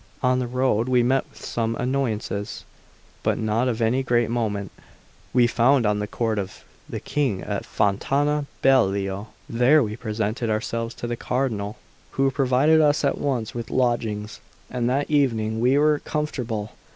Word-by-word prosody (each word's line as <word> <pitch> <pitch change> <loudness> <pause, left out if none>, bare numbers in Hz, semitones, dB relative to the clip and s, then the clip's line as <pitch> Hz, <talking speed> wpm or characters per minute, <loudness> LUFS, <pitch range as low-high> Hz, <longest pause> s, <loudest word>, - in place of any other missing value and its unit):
On 125 0 +3
the 125 - -2
road 125 -2 +1
we 125 -1 +4
met 130 +2 +1
with - - -12
some 115 -1 -1
annoyances, 115 -6 -2 0.6
but - - +1
not 110 +3 0
of 115 -2 0
any 120 +4 +2
great 120 -3 +1
moment. 105 -4 -2 0.6
We 125 -1 +4
found 120 +2 +3
the 105 0 0
Court 110 -1 -1
of 95 -1 -6 0.3
the - - -4
King 135 -10 -1
at 100 -2 -4
Fontana 140 +8 +1 0.2
Beliò; 100 -5 +2 0.2
there 130 +6 +4
we 105 -1 -3
presented 110 +1 -2
ourselves 115 +2 -2
to - - -6
the 120 0 -2
Cardinal, 115 -5 -2 0.4
who 135 0 +2
provided 135 +4 +3
us 150 -1 +3
at 140 - 0
once 125 -6 -1
with 120 -1 -5
lodgings, 115 -4 -1 0.3
and 125 -1 0
that 140 +3 0
evening 115 -7 +1
we 125 +4 +3
were 150 0 +3
comfortable. 120 -8 -3
120 Hz, 155 wpm, -24 LUFS, 110-135 Hz, 0.6 s, we